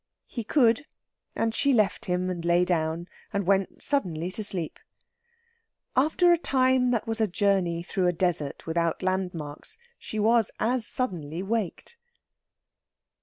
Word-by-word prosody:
He 235 - -5
could, 245 +3 +3 0.5
and 225 0 0
she 280 +3 +2
left 215 -4 +2
him 180 0 0
and 175 -2 -5
lay 175 +1 +3
down, 165 -1 -1 0.2
and 200 -1 -1
went 195 0 +1
suddenly 180 - 0
to 215 - -5
sleep. 180 -6 -2 1.2
After 315 +6 +4
a 340 - +2
time 260 -4 +2
that 235 -3 0
was 225 0 -2
a 220 - +3
journey 185 -3 +1
through 185 0 0
a - - +4
desert, 170 -5 -1
without 170 +2 -1
landmarks, 180 - -3 0.2
she 220 - -6
was 225 0 +4
as 235 0 +1
suddenly 175 - -3
waked. 220 - -3
195 Hz, 140 wpm, -27 LUFS, 175-230 Hz, 1.2 s, After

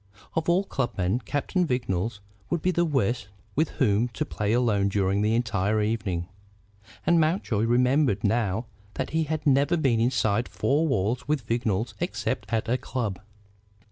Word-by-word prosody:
Of 165 +1 -1
all 180 +3 +3
club 135 -10 -3
men, 95 +5 +1
Captain 150 +5 0
Vignolles 115 - -1 0.3
would 170 -3 -1
be 185 - +3
the 175 -1 +2
worst 120 - 0 0.3
with 155 +1 +2
whom 115 -2 +3
to 115 -6 -3
play 105 0 -2
alone 110 -5 +2
during 100 0 +1
the 110 +2 +2
entire 110 -3 +1
evening. 105 -5 -1 0.8
And 170 -1 +4
Mountjoy 155 - +1
remembered 125 -2 +2
now 110 0 +1 0.3
that - - -3
he 160 +1 +1
had 155 0 -3
never 145 +4 +3
been 130 -7 +2
inside 115 -2 +1
four 150 +4 +1
walls 120 -1 0
with 145 -6 0
Vignolles 115 -1 -1
except - - -3
at 115 0 0
a 125 +3 +1
club. 110 -8 -3
120 Hz, 160 wpm, -26 LUFS, 105-145 Hz, 0.8 s, And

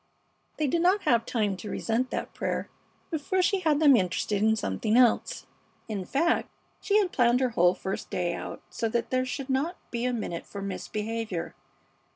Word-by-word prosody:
They 310 - +1
did 330 +5 +1
not 370 +4 +3
have 230 -2 +2
time 210 -5 0
to 210 - -7
resent 240 +3 -1
that - - -4
prayer - - -3 0.4
before 340 +4 0
she 390 +2 +2
had 310 -5 +2
them 290 -4 +7
interested 195 0 0
in 220 +1 +4
something 215 - 0
else. 245 -3 +3 0.4
In 205 -4 -4
fact, 330 - +1 0.3
she 410 - +2
had 390 -4 +2
planned 240 -1 +3
her 260 -1 +2
whole 180 -5 +3
first 190 - -5
day 175 -1 -1
out - - -6
so 225 +6 -1
that 235 +1 -1
there 255 0 +1
should 265 0 -4
not 285 +7 0
be 235 0 -2
a 250 - +1
minute 215 -8 -4
for 200 - -7
misbehavior. 210 0 -4
235 Hz, 185 wpm, -28 LUFS, 210-285 Hz, 0.4 s, them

